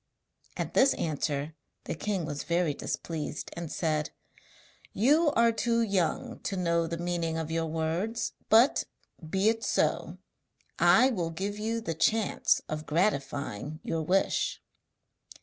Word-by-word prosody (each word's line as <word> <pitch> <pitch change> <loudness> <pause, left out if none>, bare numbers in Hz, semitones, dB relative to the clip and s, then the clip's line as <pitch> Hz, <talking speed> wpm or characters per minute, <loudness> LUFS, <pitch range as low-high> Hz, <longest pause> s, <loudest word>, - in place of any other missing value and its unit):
At - - -3
this 270 +1 +5
answer 150 -1 -2 0.3
the - - -4
king 190 +1 -2
was 145 -1 -4
very 170 -3 +1
displeased, 155 +1 -4
and 170 -2 -5
said: 155 -2 -1 0.8
'You 300 - +4
are 230 0 +5
too 230 +1 +1
young 210 +5 -1
to 195 - -3
know 170 -2 +1
the 170 +1 -3
meaning 170 -1 -2
of 160 -1 -3
your 165 0 0
words. 165 +8 -2 0.2
But, 230 +5 +5 0.4
be 190 +4 +1
it 225 0 +2
so; - - 0 0.6
I 260 +1 +6
will 175 -8 -1
give 200 +5 -4
you 225 +2 -1
the 190 -7 -3
chance 215 +6 +2
of 155 0 -5
gratifying 150 - -1
your 165 - -2
wish.' 185 +5 +1
170 Hz, 135 wpm, -29 LUFS, 160-220 Hz, 0.8 s, I